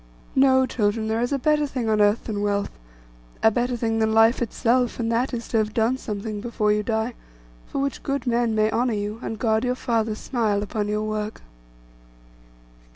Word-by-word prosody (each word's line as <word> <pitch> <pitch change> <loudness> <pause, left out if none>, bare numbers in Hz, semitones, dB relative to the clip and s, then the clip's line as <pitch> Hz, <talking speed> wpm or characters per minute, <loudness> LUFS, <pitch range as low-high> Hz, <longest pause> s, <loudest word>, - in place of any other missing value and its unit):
No, 260 -1 +5
children, 220 -2 0
there 220 +1 0
is 245 - -1
a 280 - +1
better 300 +2 +2
thing 255 -4 -3
on 215 -1 +2
earth 205 +2 +3
than 210 -3 -3
wealth, 205 -1 0 0.7
a 220 - +6
better 245 +2 -1
thing 225 -1 0
than 220 0 +1
life 225 +3 +5
itself; 240 +1 +1
and 230 -1 0
that 240 +3 +1
is, 235 -2 -4
to 230 - +1
have 215 0 -2
done 230 +3 +2
something 210 -1 -5
before 220 -2 0
you 210 0 +2
die, 220 +2 -1 0.5
for - - -6
which 275 0 -2
good 275 -2 -2
men 235 -2 +1
may 215 0 +2
honour 240 +1 +1
you, 210 +2 -4
and 225 - -4
God 220 -1 +1
your 250 0 0
Father 225 -3 -1
smile 215 -4 -1
upon 210 0 -2
your 210 +1 -1
work. 215 0 -4
225 Hz, 195 wpm, -24 LUFS, 215-245 Hz, 0.7 s, a